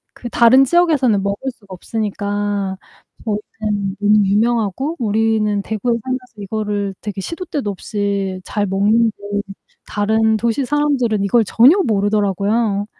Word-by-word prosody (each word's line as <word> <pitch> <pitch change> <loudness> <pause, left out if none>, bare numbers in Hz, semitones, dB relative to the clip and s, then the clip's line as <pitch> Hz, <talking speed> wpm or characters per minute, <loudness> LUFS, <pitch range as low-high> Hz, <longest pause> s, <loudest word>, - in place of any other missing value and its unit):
그 240 - -8
다른 245 +4 +6
지역에서는 275 - +2
먹을 200 +7 -2
수가 215 -4 -24
없으니까 205 -1 -3 0.5
저희는 210 -2 -3
너무 210 0 +4
유명하고 230 - 0
우리는 215 -2 +1
대구에 220 +3 -2
살면서 255 0 -5
이거를 205 -1 -3
되게 205 -2 -5
시도때도 300 - -4
없이 200 -1 -3
잘 205 -1 -2
먹는데 210 +4 +2 0.7
다른 220 +1 +1
도시사람들은 250 -1 0
이걸 220 +4 +3
전혀 245 - +5
모르더라구요. 205 0 0
215 Hz, 310 characters per minute, -18 LUFS, 200-235 Hz, 0.7 s, 다른